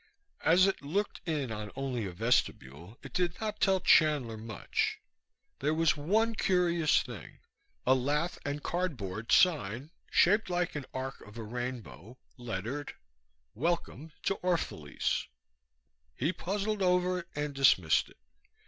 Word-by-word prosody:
As 180 Hz, +3 st, +6 dB
it 195 Hz, -, 0 dB
looked 195 Hz, +9 st, -2 dB
in 145 Hz, -7 st, -1 dB
on 105 Hz, -1 st, -5 dB
only 130 Hz, -5 st, -2 dB
a -, -, -5 dB
vestibule 90 Hz, -, -1 dB
it -, -, -10 dB
did 180 Hz, -2 st, 0 dB
not 215 Hz, -1 st, -4 dB
tell 190 Hz, -1 st, +4 dB
Chandler 150 Hz, -10 st, +4 dB
much. 110 Hz, -2 st, -2 dB, 0.6 s
There 150 Hz, +3 st, +1 dB
was 165 Hz, 0 st, +3 dB
one 215 Hz, +10 st, +1 dB
curious 175 Hz, -6 st, +2 dB
thing 120 Hz, -7 st, -10 dB, 0.5 s
a -, -, +6 dB
lath 145 Hz, +6 st, 0 dB
and 145 Hz, 0 st, -3 dB
cardboard 115 Hz, -, -3 dB
sign, 145 Hz, -, +3 dB, 0.2 s
shaped 205 Hz, +3 st, +4 dB
like 175 Hz, -1 st, 0 dB
an 145 Hz, -3 st, -5 dB
arc 130 Hz, +1 st, -5 dB
of 105 Hz, +2 st, -13 dB
a 115 Hz, -, -5 dB
rainbow, 120 Hz, -, -6 dB, 0.2 s
lettered: 120 Hz, +4 st, -5 dB, 0.6 s
WELCOME 160 Hz, +1 st, -2 dB
TO 195 Hz, -, 0 dB
ORPHALESE 165 Hz, -, -1 dB, 0.9 s
He 155 Hz, +7 st, 0 dB
puzzled 205 Hz, +3 st, -2 dB
over 180 Hz, 0 st, +2 dB
it 170 Hz, -, -9 dB
and 145 Hz, 0 st, -2 dB
dismissed 125 Hz, -12 st, +4 dB
it. -, -, -20 dB
145 Hz, 135 wpm, -31 LUFS, 115-180 Hz, 0.9 s, As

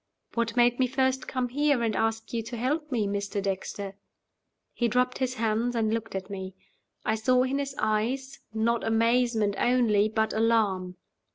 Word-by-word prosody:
"What 230 Hz, -1 st, -1 dB
made 240 Hz, +1 st, +4 dB
me 255 Hz, -, +3 dB
first 260 Hz, 0 st, 0 dB
come 255 Hz, -1 st, -1 dB
here 285 Hz, -1 st, +2 dB
and 220 Hz, -2 st, 0 dB
ask 225 Hz, +1 st, -1 dB
you 230 Hz, -, 0 dB
to 235 Hz, +1 st, -6 dB
help 295 Hz, +6 st, -1 dB
me, 225 Hz, -5 st, +1 dB
Mr. 200 Hz, 0 st, -2 dB
Dexter?" 195 Hz, 0 st, -3 dB, 0.8 s
He 240 Hz, -, +1 dB
dropped 250 Hz, +2 st, +1 dB
his 255 Hz, -1 st, -1 dB
hands, 230 Hz, +1 st, 0 dB
and 220 Hz, -1 st, +1 dB
looked 225 Hz, -2 st, -3 dB
at 190 Hz, -1 st, -4 dB
me. 190 Hz, -2 st, -6 dB, 0.5 s
I 220 Hz, -, +2 dB
saw 250 Hz, +3 st, +3 dB
in 265 Hz, +2 st, -1 dB
his 275 Hz, -1 st, -3 dB
eyes, 260 Hz, +6 st, -1 dB
not 225 Hz, +1 st, 0 dB
amazement 230 Hz, -1 st, +2 dB
only, 225 Hz, -4 st, +3 dB
but 220 Hz, 0 st, 0 dB
alarm. 210 Hz, -5 st, +1 dB
230 Hz, 170 wpm, -27 LUFS, 215-250 Hz, 0.8 s, made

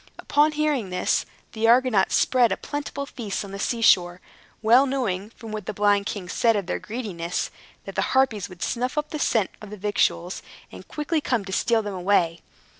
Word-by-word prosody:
Upon 300 Hz, +1 st, +2 dB
hearing 295 Hz, -9 st, 0 dB
this, 180 Hz, 0 st, 0 dB, 0.2 s
the 225 Hz, 0 st, 0 dB
Argonauts 240 Hz, -4 st, +4 dB
spread 245 Hz, -4 st, +3 dB
a -, -, 0 dB
plentiful 290 Hz, -1 st, -5 dB
feast 220 Hz, -7 st, -5 dB
on 195 Hz, -, -10 dB
the 195 Hz, -, -6 dB
sea 230 Hz, +2 st, -1 dB
shore, 175 Hz, -4 st, +4 dB, 0.4 s
well 245 Hz, +5 st, +6 dB
knowing, 215 Hz, -7 st, -2 dB
from 225 Hz, -1 st, -11 dB
what 215 Hz, -2 st, -6 dB
the 215 Hz, -, -4 dB
blind 205 Hz, 0 st, +2 dB
king 195 Hz, -4 st, -5 dB
said 230 Hz, +4 st, +2 dB
of 200 Hz, -3 st, -1 dB
their 180 Hz, -, -2 dB
greediness, 195 Hz, -7 st, -4 dB, 0.3 s
that -, -, -7 dB
the -, -, 0 dB, 0.2 s
Harpies 225 Hz, -8 st, +2 dB
would 180 Hz, -2 st, -8 dB
snuff 250 Hz, +4 st, -2 dB
up 300 Hz, 0 st, -1 dB
the 305 Hz, -, -4 dB
scent 225 Hz, -8 st, +1 dB
of 210 Hz, -, -9 dB
the 210 Hz, -, -8 dB
victuals, 190 Hz, -3 st, 0 dB, 0.3 s
and -, -, -12 dB
quickly 305 Hz, +1 st, -2 dB
come 235 Hz, -8 st, -1 dB
to 190 Hz, -, -6 dB
steal 230 Hz, +2 st, +2 dB
them 205 Hz, -1 st, -4 dB
away. 175 Hz, -3 st, +1 dB
215 Hz, 195 wpm, -24 LUFS, 195-255 Hz, 0.4 s, well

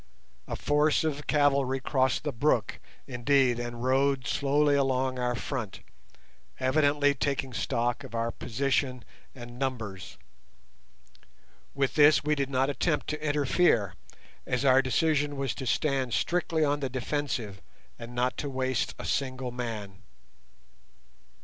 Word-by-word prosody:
A -, -, -3 dB
force 150 Hz, +1 st, +2 dB
of 150 Hz, -2 st, -3 dB
cavalry 140 Hz, -3 st, +2 dB
crossed 130 Hz, -1 st, 0 dB
the 150 Hz, -, -1 dB
brook, 120 Hz, -4 st, 0 dB, 0.3 s
indeed, 125 Hz, 0 st, +2 dB
and 120 Hz, 0 st, -5 dB
rode 135 Hz, 0 st, +2 dB
slowly 145 Hz, +3 st, +2 dB
along 130 Hz, -2 st, +1 dB
our 125 Hz, 0 st, 0 dB
front, 115 Hz, -6 st, -5 dB, 0.8 s
evidently 145 Hz, +2 st, +3 dB
taking 140 Hz, -1 st, -2 dB
stock 120 Hz, +1 st, -1 dB
of 130 Hz, -3 st, -9 dB
our 115 Hz, 0 st, -1 dB
position 130 Hz, -1 st, -1 dB, 0.3 s
and 120 Hz, -1 st, -10 dB
numbers. 110 Hz, -8 st, -4 dB, 1.6 s
With 135 Hz, -1 st, 0 dB
this 150 Hz, 0 st, +5 dB
we 150 Hz, +1 st, +1 dB
did 140 Hz, -2 st, -1 dB
not 135 Hz, 0 st, +1 dB
attempt 150 Hz, +2 st, -1 dB
to 155 Hz, 0 st, -4 dB
interfere, 145 Hz, -, +2 dB, 0.5 s
as 125 Hz, +2 st, 0 dB
our 130 Hz, 0 st, +6 dB
decision 145 Hz, +1 st, +1 dB
was 135 Hz, -2 st, -1 dB
to 130 Hz, -, -6 dB
stand 135 Hz, -3 st, 0 dB
strictly 165 Hz, -2 st, 0 dB
on 145 Hz, 0 st, 0 dB
the 135 Hz, -2 st, -2 dB
defensive, 125 Hz, -6 st, -3 dB, 0.4 s
and 120 Hz, +1 st, -9 dB
not 125 Hz, +1 st, 0 dB
to 145 Hz, -, -3 dB
waste 130 Hz, -1 st, -1 dB
a -, -, -7 dB
single 130 Hz, -2 st, -2 dB
man. 110 Hz, -6 st, -6 dB
135 Hz, 130 wpm, -28 LUFS, 125-145 Hz, 1.6 s, our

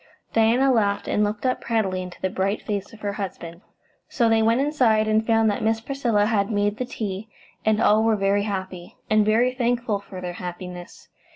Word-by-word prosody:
Diana 235 Hz, +4 st, +4 dB
laughed, 200 Hz, -3 st, +1 dB
and 210 Hz, -, +1 dB
looked 210 Hz, +3 st, -2 dB
up 255 Hz, -, 0 dB
proudly 195 Hz, -5 st, -1 dB
into 180 Hz, -1 st, -9 dB
the 190 Hz, -, 0 dB
bright 195 Hz, +3 st, -1 dB
face 205 Hz, -2 st, -4 dB
of 225 Hz, -2 st, -15 dB
her 205 Hz, -1 st, -2 dB
husband. 175 Hz, -4 st, -6 dB, 0.5 s
So 235 Hz, -5 st, +2 dB
they 225 Hz, 0 st, +3 dB
went 225 Hz, +2 st, +3 dB
inside, 250 Hz, -7 st, +2 dB
and 215 Hz, 0 st, +2 dB
found 225 Hz, -1 st, +3 dB
that 205 Hz, -, -3 dB
Miss 225 Hz, 0 st, +1 dB
Priscilla 235 Hz, -4 st, 0 dB
had 205 Hz, -2 st, +1 dB
made 205 Hz, -1 st, 0 dB
the 255 Hz, -, -2 dB
tea, 210 Hz, -2 st, -5 dB, 0.3 s
and 215 Hz, 0 st, +2 dB
all 215 Hz, -1 st, +4 dB
were 225 Hz, -1 st, +3 dB
very 200 Hz, 0 st, +1 dB
happy, 190 Hz, -3 st, -5 dB
and 215 Hz, 0 st, +5 dB
very 230 Hz, +4 st, +2 dB
thankful 240 Hz, -4 st, 0 dB
for 195 Hz, -2 st, -10 dB
their 180 Hz, -1 st, -5 dB
happiness. 180 Hz, 0 st, -8 dB
215 Hz, 195 wpm, -23 LUFS, 195-225 Hz, 0.5 s, and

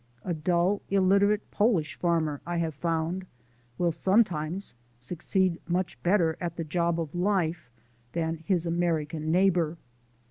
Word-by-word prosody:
A 180 Hz, -, -1 dB
dull, 175 Hz, +5 st, +1 dB
illiterate 200 Hz, +2 st, +3 dB
Polish 205 Hz, -8 st, +2 dB
farmer, 160 Hz, -4 st, 0 dB
I 175 Hz, 0 st, -3 dB
have 165 Hz, -2 st, -1 dB
found, 165 Hz, +4 st, -2 dB, 0.5 s
will 175 Hz, -1 st, +2 dB
sometimes 185 Hz, -1 st, +1 dB, 0.3 s
succeed 175 Hz, +5 st, 0 dB
much 175 Hz, +1 st, -2 dB
better 175 Hz, -3 st, +2 dB
at 170 Hz, -2 st, -3 dB
the 170 Hz, -, -3 dB
job 170 Hz, +1 st, 0 dB
of 160 Hz, -3 st, -4 dB
life 175 Hz, -6 st, 0 dB, 0.4 s
than 165 Hz, -1 st, -1 dB
his 180 Hz, -4 st, +1 dB
American 160 Hz, -2 st, -1 dB
neighbour. 175 Hz, -3 st, +2 dB
170 Hz, 130 wpm, -28 LUFS, 160-185 Hz, 0.5 s, illiterate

